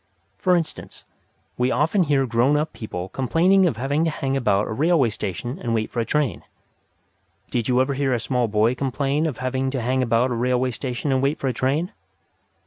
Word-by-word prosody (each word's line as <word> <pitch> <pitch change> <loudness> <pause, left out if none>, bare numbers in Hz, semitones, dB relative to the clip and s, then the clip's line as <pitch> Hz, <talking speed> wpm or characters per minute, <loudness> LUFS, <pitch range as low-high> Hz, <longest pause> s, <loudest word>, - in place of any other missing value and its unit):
For 180 -1 +3
instance, 165 -3 -4 0.5
we 125 +1 +2
often 165 +9 +2
hear 140 -3 +2
grown 125 +4 +2
up 155 +1 -2
people 95 -4 -6
complaining 175 - +3
of 125 - -2
having 140 +6 0
to - - +2
hang 135 -3 -2
about 105 -6 +1
a - - -5
railway 145 0 +2
station 105 +5 -5
and 115 -2 -1
wait 110 -1 -2
for 120 - -3
a 115 - 0
train. 150 -2 0 1.1
Did 120 -3 -1
you 125 0 +2
ever 130 +2 +2
hear 135 0 0
a 120 - +1
small 120 +1 0
boy 110 +3 +2
complain 140 +4 -1
of 140 -7 -4
having 130 +1 -1
to 130 0 -2
hang 130 +2 0
about 120 +1 +2
a - - 0
railway 125 +2 +1
station 125 +3 -3
and 130 -1 +2
wait 140 +3 +1
for 135 - -1
a - - -1
train? 150 - 0
130 Hz, 205 wpm, -23 LUFS, 120-145 Hz, 1.1 s, For